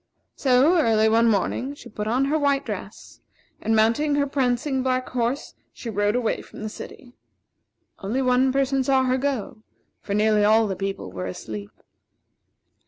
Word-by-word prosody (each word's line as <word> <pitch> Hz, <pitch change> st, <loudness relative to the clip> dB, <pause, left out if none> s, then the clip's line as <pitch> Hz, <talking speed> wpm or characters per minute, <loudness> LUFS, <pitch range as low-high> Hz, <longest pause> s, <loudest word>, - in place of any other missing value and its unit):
So, 275 Hz, +6 st, +4 dB
early 220 Hz, -4 st, +3 dB
one 230 Hz, +1 st, +4 dB
morning, 245 Hz, +6 st, -1 dB
she -, -, -13 dB
put 210 Hz, 0 st, -5 dB
on 250 Hz, +5 st, +1 dB
her 305 Hz, +3 st, +1 dB
white 280 Hz, -1 st, +1 dB
dress, -, -, -8 dB, 0.4 s
and 220 Hz, +1 st, +1 dB
mounting 230 Hz, +7 st, +2 dB
her 285 Hz, 0 st, +2 dB
prancing 265 Hz, 0 st, 0 dB
black 255 Hz, 0 st, -1 dB
horse, 245 Hz, +2 st, -2 dB, 0.2 s
she 230 Hz, -, -7 dB
rode 205 Hz, +1 st, +1 dB
away 245 Hz, -3 st, 0 dB
from -, -, -11 dB
the 215 Hz, -, -3 dB
city. 245 Hz, +3 st, -11 dB, 0.9 s
Only 235 Hz, +7 st, -2 dB
one 255 Hz, +1 st, +3 dB
person 270 Hz, 0 st, +1 dB
saw 265 Hz, 0 st, +3 dB
her 255 Hz, 0 st, +1 dB
go, 255 Hz, -6 st, -3 dB, 0.4 s
for 200 Hz, -, -4 dB
nearly 210 Hz, 0 st, +3 dB
all 220 Hz, +2 st, +4 dB
the 195 Hz, -2 st, -2 dB
people 195 Hz, -, -4 dB
were 90 Hz, 0 st, -5 dB
asleep. 100 Hz, +2 st, -7 dB
245 Hz, 165 wpm, -24 LUFS, 215-270 Hz, 0.9 s, So